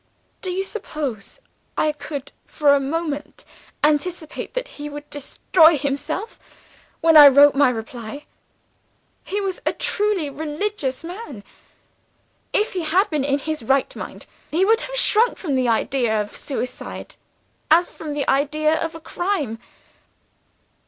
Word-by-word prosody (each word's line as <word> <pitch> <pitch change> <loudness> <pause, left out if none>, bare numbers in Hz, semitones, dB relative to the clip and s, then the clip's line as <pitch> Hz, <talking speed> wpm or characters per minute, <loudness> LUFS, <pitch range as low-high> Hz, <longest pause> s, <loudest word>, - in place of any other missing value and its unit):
'Do 375 - -4
you 370 +2 -1
suppose 300 - -5 0.4
I 305 - +2
could 290 -2 -7 0.2
for 290 -2 +3
a 285 - +4
moment 295 +1 -4 0.4
anticipate 310 +5 -1
that - - -2
he 295 -7 -8
would 290 0 -8
destroy 315 +3 +3
himself, 295 - -3 0.6
when 325 0 +5
I 295 -2 +12
wrote 285 +1 +7
my 280 -1 +4
reply? 235 +3 -6 1.0
He 405 - -2
was 385 -2 -3
a - - 0
truly 410 -6 0
religious 300 0 -3
man. 335 - -8 1.1
If 425 - +1
he 370 - -2
had 345 +6 +2
been 300 -3 0
in 275 0 +1
his 310 +1 -4
right 265 +4 +1
mind, - - -8 0.2
he 355 +5 +2
would 450 +3 +3
have - - -5
shrunk 470 -1 +4
from 310 -7 -3
the 255 -1 +1
idea 230 -1 +1
of 210 0 -4
suicide 255 -3 -5 0.5
as 340 +3 +5
from 305 -2 -7
the 290 -1 -2
idea 305 +3 +1
of 325 0 -4
a - - -7
crime. 320 - -2
300 Hz, 140 wpm, -22 LUFS, 275-355 Hz, 1.1 s, I